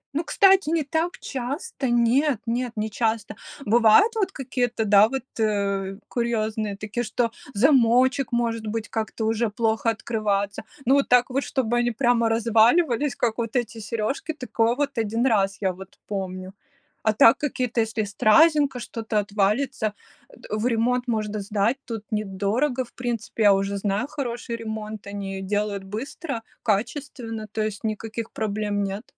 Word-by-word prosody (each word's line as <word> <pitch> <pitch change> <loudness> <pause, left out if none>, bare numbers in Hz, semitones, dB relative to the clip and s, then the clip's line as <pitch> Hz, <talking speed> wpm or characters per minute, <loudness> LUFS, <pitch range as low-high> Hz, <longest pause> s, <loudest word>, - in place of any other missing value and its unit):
Ну, 315 - 0
кстати, 385 0 +4
не 325 -2 +1
так 320 +5 -1
часто, 270 - -4
нет 240 +3 +3
нет, 240 +1 -2
не 215 +1 -1
часто. 225 0 -1 0.3
Бывают 235 - +5
вот 400 -3 0
какие-то, 245 -4 -2
да, 205 +1 +6
вот, 270 -2 -3 0.2
э, 200 -2 0
курьезные 220 -3 -1
такие, 215 +3 -3
что 230 +1 -1 0.2
замочек, 255 +1 +4
может 230 -2 -1
быть, 225 +1 -3
как-то 220 0 -3
уже 225 0 +1
плохо 225 +1 0
открываться. 210 -3 -1 0.2
Ну 270 +3 +5
вот 280 - +1
так 250 +1 +5
вот, 275 +1 0
чтобы 245 -2 -1
они 240 0 +2
прямо 235 -1 +2
разваливались, 235 +5 +3
как 235 -1 -1
вот 230 +1 -3
эти 235 -2 -1
сережки, 230 +9 -3
такое 240 -4 0
вот 280 -1 -2
1 225 +3 0
раз 195 -5 +2
я 190 -2 +1
вот 190 +1 -13
помню. 185 -2 -5 0.5
А 215 - +5
так 230 +1 +6
какие-то, 250 -5 -1
если 220 0 -1
стразинка, 275 +7 +4
что-то 225 -2 -2
отвалится, 210 +3 0 0.4
а, - - -20
э, - - -20
в 215 +3 0
ремонт 245 +1 +1
можно 215 -2 -1
сдать, 210 +4 0
тут 225 -3 -6
недорого. 215 +6 -1
В - - -22
принципе, 235 -3 -3
я 205 - +7
уже 195 +1 0
знаю 205 +5 -1
хороший 240 -5 -4
ремонт, 220 -2 -6
они 200 -1 -5
ее - - -5
делают 205 0 -2
быстро, 230 - -5 0.2
качественно, 225 0 -2
то 215 - -2
есть 215 -1 -4
никаких 220 +1 -4
проблем 210 -1 -2
нет. 195 +2 -4
225 Hz, 155 wpm, -24 LUFS, 210-250 Hz, 0.5 s, я